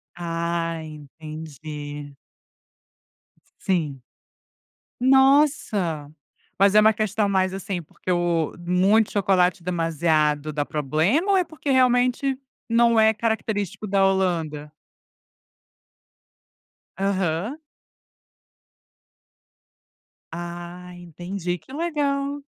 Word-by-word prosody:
Ah, 170 Hz, -1 st, -2 dB
entendi. 150 Hz, -1 st, -9 dB, 1.4 s
Sim. 155 Hz, -8 st, -1 dB, 1.0 s
Nossa, 260 Hz, -, +3 dB, 0.5 s
mas 200 Hz, +1 st, +4 dB
é 215 Hz, -, +8 dB
uma 215 Hz, +1 st, +5 dB
questão 210 Hz, -1 st, 0 dB
mais 190 Hz, -1 st, +1 dB
assim 195 Hz, -1 st, -4 dB
porque 165 Hz, -, -8 dB
o, 175 Hz, -3 st, +1 dB
muito 185 Hz, +5 st, +2 dB
chocolate 185 Hz, -3 st, +2 dB
demasiado 160 Hz, -3 st, 0 dB
dá 145 Hz, -1 st, -1 dB
problema, 160 Hz, -, +1 dB
ou -, -, +4 dB
é 370 Hz, -, +3 dB
porque 310 Hz, -3 st, -6 dB
realmente 255 Hz, +1 st, +3 dB, 0.3 s
não 235 Hz, 0 st, +4 dB
é 220 Hz, 0 st, +5 dB
característico 215 Hz, -2 st, -2 dB
da 195 Hz, -1 st, +2 dB
Holanda? 165 Hz, -6 st, -1 dB, 2.3 s
Aham. 195 Hz, -, -1 dB, 2.7 s
Ah, 175 Hz, +1 st, -7 dB
entendi 175 Hz, +1 st, -5 dB
que 180 Hz, -, -16 dB
legal. 285 Hz, -3 st, -1 dB
180 Hz, 80 wpm, -23 LUFS, 165-220 Hz, 2.7 s, é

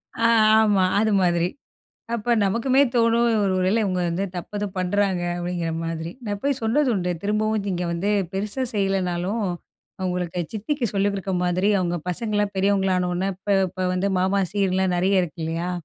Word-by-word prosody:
ஆ 230 Hz, -, +2 dB, 0.3 s
ஆமா 205 Hz, -3 st, +3 dB, 0.2 s
அது 220 Hz, +1 st, +2 dB
மாதிரி. 175 Hz, -1 st, +2 dB, 0.7 s
அப்ப 235 Hz, +1 st, 0 dB
நமக்குமே 235 Hz, +7 st, +2 dB
தோணும், 230 Hz, 0 st, +3 dB, 0.2 s
ஒருவேள 185 Hz, +1 st, +1 dB
இவுங்க 185 Hz, -2 st, -1 dB
வந்து 175 Hz, +4 st, -1 dB
தப்பு 180 Hz, +4 st, -6 dB
ஏதும் 205 Hz, -2 st, -4 dB
பண்றாங்க 185 Hz, 0 st, 0 dB
அப்படிங்கிற 175 Hz, -1 st, -3 dB
மாதிரி. 165 Hz, 0 st, -4 dB
நான் 205 Hz, -1 st, -3 dB
போய் 280 Hz, -2 st, 0 dB
சொன்னது 255 Hz, +5 st, +2 dB
உண்டு, 180 Hz, -2 st, -1 dB
திரும்பவும் 215 Hz, 0 st, 0 dB
நீங்க 180 Hz, -2 st, -2 dB
வந்து 190 Hz, +5 st, -1 dB, 0.2 s
பெருசா 210 Hz, +7 st, -2 dB
செய்யலனாலும் 195 Hz, +1 st, -1 dB, 0.6 s
அவுங்களுக்கு 180 Hz, -1 st, -2 dB
சித்திக்கு 240 Hz, +5 st, -2 dB
சொல்லி 200 Hz, 0 st, +2 dB
கொடுக்கற 195 Hz, -1 st, -3 dB
மாதிரி. 180 Hz, +3 st, +1 dB
அவங்க 175 Hz, -1 st, -1 dB
பசங்களாம் 205 Hz, +2 st, -1 dB
பெரியவங்கள 195 Hz, -1 st, +2 dB
ஆன 180 Hz, 0 st, 0 dB
உடனே, 185 Hz, +2 st, -1 dB
இப்போ 200 Hz, +2 st, -1 dB
இப்ப 185 Hz, +1 st, -3 dB
வந்து 195 Hz, +2 st, 0 dB
மாமா 190 Hz, +2 st, +2 dB
சீர்லாம் 190 Hz, -2 st, +1 dB
நெறைய 185 Hz, +1 st, +3 dB
இருக்கு 170 Hz, -1 st, -6 dB
இல்லையா. 165 Hz, +2 st, -2 dB
195 Hz, 160 wpm, -23 LUFS, 180-210 Hz, 0.7 s, ஆமா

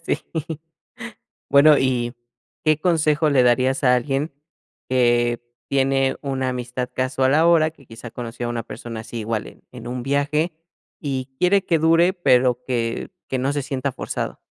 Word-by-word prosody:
Sí. -, -, 0 dB, 1.3 s
Bueno, 145 Hz, +1 st, +7 dB
y, 125 Hz, -2 st, 0 dB, 0.5 s
¿qué 155 Hz, -1 st, +3 dB
consejo 155 Hz, -2 st, +2 dB
le 130 Hz, -3 st, +4 dB
darías 130 Hz, +2 st, +2 dB
a 125 Hz, 0 st, +6 dB
alguien, 135 Hz, +5 st, -1 dB, 0.6 s
que 120 Hz, -2 st, +2 dB, 0.3 s
tiene 135 Hz, 0 st, +1 dB
una 130 Hz, -2 st, -1 dB
amistad 125 Hz, 0 st, -4 dB
casual 130 Hz, +1 st, +1 dB
ahora? 160 Hz, 0 st, +4 dB
Que, 140 Hz, -5 st, -22 dB
quizá, 115 Hz, +1 st, -10 dB
conoció 120 Hz, 0 st, -6 dB
a -, -, -3 dB
una 120 Hz, -1 st, -3 dB
persona, 115 Hz, -2 st, -7 dB
así, 115 Hz, +1 st, -7 dB
igual 110 Hz, 0 st, -2 dB
en -, -, -14 dB
en 120 Hz, -2 st, -10 dB
un 125 Hz, 0 st, -4 dB
viaje, 145 Hz, +5 st, 0 dB, 0.5 s
y 135 Hz, -3 st, -3 dB
quiere 190 Hz, +2 st, +3 dB
que 165 Hz, -3 st, +2 dB
dure, 165 Hz, +3 st, +4 dB
pero 125 Hz, -8 st, +2 dB
que 115 Hz, +2 st, -2 dB, 0.2 s
que 130 Hz, -, -1 dB
no 135 Hz, +3 st, 0 dB
se 145 Hz, -1 st, -2 dB
sienta 135 Hz, +1 st, -2 dB
forzado. -, -, -4 dB
130 Hz, 155 wpm, -22 LUFS, 125-150 Hz, 1.3 s, Bueno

